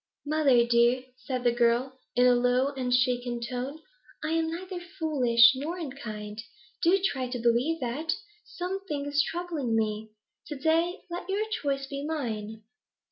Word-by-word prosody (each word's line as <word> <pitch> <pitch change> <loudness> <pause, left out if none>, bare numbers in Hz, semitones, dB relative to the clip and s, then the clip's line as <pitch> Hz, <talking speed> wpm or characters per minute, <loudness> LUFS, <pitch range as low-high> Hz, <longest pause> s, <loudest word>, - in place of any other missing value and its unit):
'Mother 285 -6 +4
dear,' 240 +1 +3
said 255 -1 -4
the 240 - +4
girl, 240 +2 +1 0.2
in 250 +1 +5
a 250 - +6
low 250 +2 +2
and 260 -3 -3
shaken 245 -1 +1
tone, 255 +6 -5 0.4
'I 310 - -1
am 325 0 +1
neither 365 +2 -5 0.2
foolish 250 -7 +6
nor 305 +7 -4
unkind; 215 -9 -6 0.4
do 365 +4 +4
try 265 -8 -1
to 250 - -3
believe 240 +7 +2
that. 285 +7 -1 0.3
Something 360 -5 -4
is 290 +1 +2
troubling 320 -7 -2
me. 215 0 -1 0.4
To 300 - -5
day 330 +5 +1
let 350 +2 -5
your 405 +3 0
choice 275 -8 -1
be 275 +1 -5
mine.' 220 -8 -4
265 Hz, 150 wpm, -28 LUFS, 240-320 Hz, 0.4 s, a